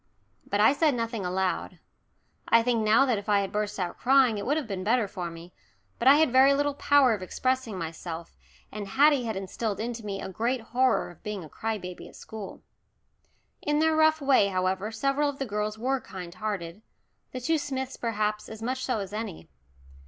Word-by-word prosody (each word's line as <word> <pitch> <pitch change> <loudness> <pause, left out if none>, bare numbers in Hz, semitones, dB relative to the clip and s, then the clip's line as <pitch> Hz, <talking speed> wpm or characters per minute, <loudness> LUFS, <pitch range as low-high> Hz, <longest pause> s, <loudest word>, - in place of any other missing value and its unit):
But 205 - -1
I 220 +6 +6
said 295 -2 +2
nothing 230 -3 -3
aloud. 185 +1 -2 0.7
I 230 0 +5
think 230 -2 +1
now 220 +5 +5
that 240 -6 +1
if 205 +1 -9
I 205 -1 +4
had 195 - -4
burst 210 -1 -2
out 180 -2 -3
crying 255 -4 +4
it 200 - -5
would 290 +3 +2
have 310 - -2
been 190 -3 -4
better 225 +1 +2
for 180 -2 -5
me, 165 +2 -11 0.5
but 245 - +1
I 275 - +9
had 310 -3 +3
very 265 +2 +6
little 290 0 +1
power 280 -3 +4
of 205 - -4
expressing 255 +2 -1
myself, 165 0 -6 0.4
and 205 -1 -6
Haddie 280 +3 +4
had 220 -2 -2
instilled 195 +2 -3
into 230 +1 -4
me 200 -2 -4
a - - -5
great 235 +6 -1
horror 250 -2 +1
of 175 - -19
being 210 -3 -5
a 155 - -11
cry 220 +5 -3
baby 180 -2 -8
at - - -15
school. 215 -3 -9 1.0
In 295 0 0
their 320 +1 +3
rough 315 0 +4
way, 270 -7 +4
however, 190 +2 -1
several 275 +6 +1
of 280 - -6
the 270 - -2
girls 210 -1 -3
were 260 +3 -1
kind 180 -4 -8
hearted, 190 -2 -4 0.5
the 255 - -5
two 320 +5 +1
Smiths 265 -2 -4
perhaps 215 -2 -2
as 220 0 -8
much 255 +2 -2
so 255 -3 0
as 195 0 -7
any. 215 -5 -6
220 Hz, 205 wpm, -27 LUFS, 195-260 Hz, 1.0 s, I